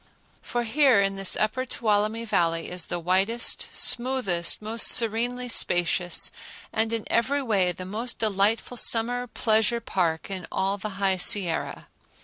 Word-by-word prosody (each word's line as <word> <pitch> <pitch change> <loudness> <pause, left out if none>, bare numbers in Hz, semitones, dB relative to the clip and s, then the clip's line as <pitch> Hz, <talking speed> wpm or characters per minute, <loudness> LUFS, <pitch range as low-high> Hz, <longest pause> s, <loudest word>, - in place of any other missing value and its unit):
For 240 0 -3
here 255 -1 +3
in 195 0 0
this 195 -1 +1
upper 215 +4 -1
Tuolumne 220 -2 -1
Valley 165 -6 -1
is 180 -2 -3
the 175 - -3
widest, 190 +7 0
smoothest, 240 -9 +1
most 220 +2 +2
serenely 240 +2 +2
spacious, 175 -5 +1 0.4
and 220 0 0
in 225 -2 -3
every 275 +5 0
way 195 -7 +1
the 185 +1 -9
most 225 +6 -4
delightful 215 +3 0
summer 245 +2 +2
pleasure 225 0 0
park 175 -5 -2
in 185 -2 -6
all 195 +1 -2
the 200 0 -7
High 195 -1 0
Sierra. 180 -2 0
215 Hz, 140 wpm, -25 LUFS, 185-235 Hz, 0.4 s, here